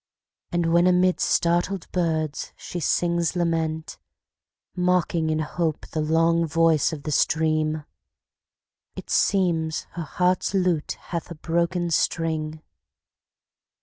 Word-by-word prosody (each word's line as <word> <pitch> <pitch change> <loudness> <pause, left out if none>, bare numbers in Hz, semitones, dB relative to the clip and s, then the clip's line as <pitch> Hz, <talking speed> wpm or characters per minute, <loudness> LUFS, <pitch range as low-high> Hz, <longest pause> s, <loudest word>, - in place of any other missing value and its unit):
And 170 -2 +1
when 170 +1 +5
amid 180 0 +3
startled 175 +2 +1
birds 160 -4 -1
she 175 - -6
sings 170 +2 +1
lament, 165 -2 -1 0.8
Mocking 180 -3 +1
in 155 - +1
hope 155 0 -2
the 155 - -2
long 165 +2 +2
voice 165 0 +3
of 150 -3 -7
the 155 - -3
stream, 155 +1 +1 1.1
It - - -8
seems 165 -5 +1
her 175 - -6
heart's 180 +4 0
lute 180 -5 +1
hath 170 0 -6
a 170 - -7
broken 170 +2 -1
string. 155 -1 -1
165 Hz, 115 wpm, -24 LUFS, 155-175 Hz, 1.1 s, when